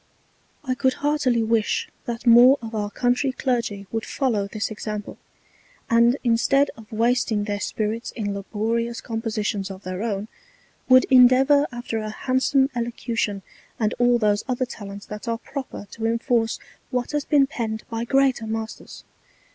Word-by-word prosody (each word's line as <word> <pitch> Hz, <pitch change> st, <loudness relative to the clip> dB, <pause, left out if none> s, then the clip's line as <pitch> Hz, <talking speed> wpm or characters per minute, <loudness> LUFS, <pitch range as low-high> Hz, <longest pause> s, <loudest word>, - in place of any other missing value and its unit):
I 260 Hz, -3 st, -1 dB
could 260 Hz, 0 st, +1 dB
heartily 265 Hz, -6 st, +2 dB
wish 220 Hz, -1 st, +1 dB, 0.2 s
that 235 Hz, +1 st, -5 dB
more 245 Hz, +3 st, +8 dB
of 225 Hz, -1 st, -8 dB
our 210 Hz, -1 st, -2 dB
Country 245 Hz, +4 st, +1 dB
Clergy 235 Hz, -6 st, -2 dB
would 225 Hz, -1 st, -2 dB
follow 225 Hz, -8 st, -1 dB
this 215 Hz, +2 st, -3 dB
Example; 210 Hz, -1 st, -6 dB, 0.7 s
and 235 Hz, +3 st, +5 dB
in 235 Hz, -2 st, +3 dB
stead 275 Hz, +4 st, +2 dB
of 220 Hz, -1 st, -15 dB
wasting 225 Hz, -1 st, +1 dB
their 205 Hz, -1 st, -3 dB
Spirits 220 Hz, +3 st, -3 dB
in 205 Hz, -3 st, -3 dB
laborious 225 Hz, +4 st, -2 dB
Compositions 215 Hz, -3 st, -3 dB
of 195 Hz, 0 st, -9 dB
their 185 Hz, +1 st, -5 dB
own, 210 Hz, -2 st, -2 dB, 0.6 s
would 255 Hz, 0 st, +8 dB
endeavour 265 Hz, +3 st, +6 dB
after 240 Hz, -2 st, -4 dB
a 215 Hz, 0 st, -4 dB
handsome 265 Hz, +4 st, +1 dB
Elocution, 235 Hz, -4 st, -2 dB, 0.4 s
and 215 Hz, -1 st, +1 dB
all 245 Hz, 0 st, +4 dB
those 210 Hz, -2 st, +1 dB
other 255 Hz, 0 st, 0 dB
Talents 200 Hz, -4 st, -9 dB
that 210 Hz, +2 st, -8 dB
are 230 Hz, 0 st, 0 dB
proper 260 Hz, -3 st, -7 dB
to 225 Hz, 0 st, -3 dB
enforce 230 Hz, 0 st, 0 dB, 0.3 s
what 250 Hz, -1 st, -2 dB
has 295 Hz, -1 st, -1 dB
been 285 Hz, -2 st, +4 dB
penned 220 Hz, -5 st, -4 dB
by 225 Hz, 0 st, -2 dB
greater 265 Hz, -2 st, +2 dB
Masters. 220 Hz, 0 st, -6 dB
230 Hz, 155 wpm, -23 LUFS, 215-255 Hz, 0.7 s, more